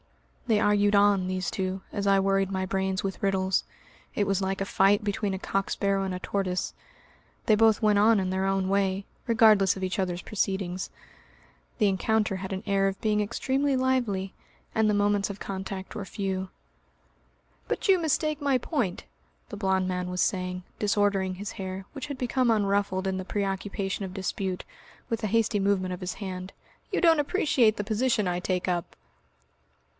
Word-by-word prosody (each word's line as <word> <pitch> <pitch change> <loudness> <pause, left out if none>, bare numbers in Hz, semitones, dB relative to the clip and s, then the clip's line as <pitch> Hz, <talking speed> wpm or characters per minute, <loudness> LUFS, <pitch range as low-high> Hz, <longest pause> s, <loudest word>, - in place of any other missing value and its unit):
(They 220 -3 +3
argued 205 0 +3
on, 200 -2 +4
these 185 -1 -2
two, 190 0 -2
as 200 0 -1
I 195 0 +5
worried 195 0 +1
my 190 -1 -1
brains 190 0 -1
with 195 -1 -4
riddles. 190 -1 +1 0.5
It 205 - +1
was 195 0 +1
like 190 0 -1
a 195 - -1
fight 195 +1 +3
between 205 -1 -1
a 190 - -3
cock 195 0 -1
sparrow 195 -1 0
and 190 -1 -2
a 180 - -4
tortoise; 185 -1 -2 0.7
they 215 - +5
both 220 0 +4
went 210 -1 +4
on 215 +1 +5
in 185 -1 -1
their 190 +1 0
own 195 -1 +1
way, 195 0 +1 0.2
regardless 215 -5 +5
of 190 - -5
each 185 +1 -2
other's 180 -2 -2
proceedings. 190 -3 -2 0.9
The 215 - +3
encounter 210 +1 +1
had 190 +1 -6
an 190 +1 -4
air 195 0 +2
of 195 - -7
being 210 -1 +1
extremely 270 +6 0
lively, 240 -8 0 0.4
and 220 -1 +3
the - - +3
moments 205 0 +2
of 200 0 -6
contact 190 0 -6
were 210 - -4
few. 190 -1 -3 1.2
"But - - -1
you 385 -1 +6
mistake 310 -2 0
my 280 -2 +3
point," 245 - -2 0.4
the 210 - -6
blond 190 -2 +1
man 180 -1 -2
was 180 0 -4
saying, 180 -1 -1 0.2
disordering 200 -2 +1
his 205 +3 -6
hair 190 0 -6
which 295 0 -6
had 285 -2 -5
become 250 0 +1
unruffled 200 -3 +1
in 190 0 -1
the 185 - -3
preoccupation 195 0 -2
of 190 -1 -6
dispute 190 -1 -3 0.4
with 230 -1 -2
a - - +1
hasty 225 0 +2
movement 195 -2 +1
of 180 - -7
his 180 0 -4
hand, 185 -2 -6 0.4
"you - - +1
don't 330 -3 +5
appreciate 275 - +2
the 205 - -3
position 220 -1 +1
I 175 0 0
take 180 0 -1
up.") 175 -2 -2
195 Hz, 180 wpm, -27 LUFS, 190-215 Hz, 1.2 s, you